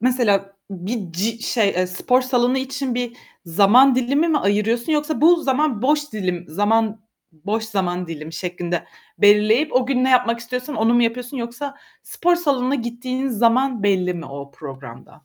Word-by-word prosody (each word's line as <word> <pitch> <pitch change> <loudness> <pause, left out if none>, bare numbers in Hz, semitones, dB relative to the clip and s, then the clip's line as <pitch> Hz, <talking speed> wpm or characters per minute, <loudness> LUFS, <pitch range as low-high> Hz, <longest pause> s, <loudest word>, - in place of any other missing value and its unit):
mesela 205 -6 +1
bir 190 0 -5
ci 225 +6 -2
şey 220 -5 +1
e, 185 0 +1
spor 250 +8 +1
salonu 255 0 +1
için 265 -1 -3
bir 245 -1 -3 0.3
zaman 220 +10 +5
dilimi 275 +6 +1
mi 300 -2 +2
ayırıyorsun 225 +7 0
yoksa 300 0 -1
bu 335 +1 +5
zaman 265 -4 0
boş 295 +1 +1
dilim 180 -4 -3
zaman 215 +5 0 0.3
boş 205 +8 -3
zaman 180 -4 -2
dilimi 160 0 -7
şeklinde 175 0 -4 0.3
belirleyip 215 +8 +4
o 255 0 +3
gün 255 -2 +1
ne 260 - +2
yapmak 245 -2 +3
istiyorsan 250 +4 -5
onu 225 +2 +2
mu 240 - +4
yapıyorsun 245 +3 -2
yoksa 250 +4 -5 0.3
spor 350 0 +1
salonuna 275 -5 0
gittiğiniz 255 0 -3
zaman 240 0 +2
belli 185 -3 +1
mi 170 - -7
o 140 +1 -9
programda? 135 -1 -12
235 Hz, 160 wpm, -21 LUFS, 195-255 Hz, 0.3 s, zaman